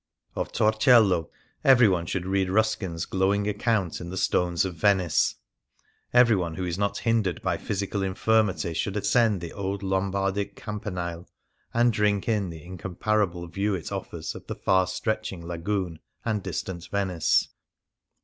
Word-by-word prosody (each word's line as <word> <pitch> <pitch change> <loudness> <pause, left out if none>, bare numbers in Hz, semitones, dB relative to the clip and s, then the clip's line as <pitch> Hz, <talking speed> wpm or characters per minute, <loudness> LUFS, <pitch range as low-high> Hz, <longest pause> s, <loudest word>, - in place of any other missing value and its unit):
Of - - -3
Torcello 110 -5 +4 0.3
everyone 110 -10 +5
should 90 -1 -2
read 95 0 0
Rus 110 +3 +3
kin's, 85 -6 -4
glowing 100 +2 +1
account 105 -4 0
in 85 - -6
the 95 - -5
"Stones 90 -1 +1
of 95 - -3
Venice"; 90 -2 +2 0.8
everyone 110 -9 +4
who 90 - -3
is 85 -1 -2
not 100 +2 -1
hindered 110 -7 0
by - - 0
physical 100 0 -3
in 95 -1 -1
95 - - -15
Things - - -17
Seen 110 0 +5
in 110 - +4
Venice 95 - -3
firmity 85 - -4
should 100 0 -3
ascend 105 -1 +2
the 85 - -6
old 100 0 -3
Lombardic 95 +1 -1
Cam 105 -1 -6
panile 90 -4 -5 0.4
and 120 0 +3
drink 105 -2 +1
in 105 -5 +1
the 80 -2 -9
incomparable 90 +1 -1
view 100 +4 -1
it 85 - -6
offers - - -5
of - - -11
the - - -4
far 95 -1 +2
stretching 110 -6 -3
Lagoon 85 0 -3 0.3
and 110 -3 0
distant 85 -1 -5
Venice. 95 -5 +1
95 Hz, 170 wpm, -26 LUFS, 90-105 Hz, 0.8 s, everyone